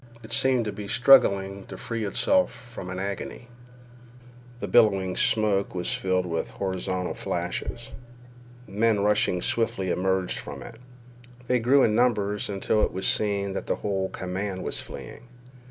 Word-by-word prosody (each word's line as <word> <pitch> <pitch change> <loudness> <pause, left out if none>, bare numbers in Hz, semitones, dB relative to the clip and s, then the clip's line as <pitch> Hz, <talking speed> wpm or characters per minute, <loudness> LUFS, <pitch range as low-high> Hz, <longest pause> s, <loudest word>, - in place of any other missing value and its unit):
It 110 - -4
seemed 130 -3 +3
to 105 - -2
be 105 0 -7
struggling 100 -6 +4
to - - -8
free 115 -2 -4
itself 280 - +2
from 120 -6 -10
an 95 - -5
agony. 100 +5 -5 1.1
The - - -4
billowing 100 -6 +3
smoke 100 -3 +2
was 90 -1 -1
filled 95 -1 0
with 85 -7 -2
horizontal 95 +3 -3
flashes. - - -4 0.8
Men 105 +1 +1
rushing 105 -3 +2
swiftly 95 -5 0
emerged 95 0 0
from - - -8
it. 115 - -12 0.6
They 125 0 +2
grew 130 +4 +4
in 110 - +3
numbers 105 -4 +1
until 100 +2 0
it - - +1
was 95 +1 -3
seen 100 -2 +1
that - - -5
the - - +1
whole 95 -2 -2
command 95 +1 -4
was - - -2
fleeing. 120 - -10
100 Hz, 150 wpm, -26 LUFS, 95-115 Hz, 1.1 s, struggling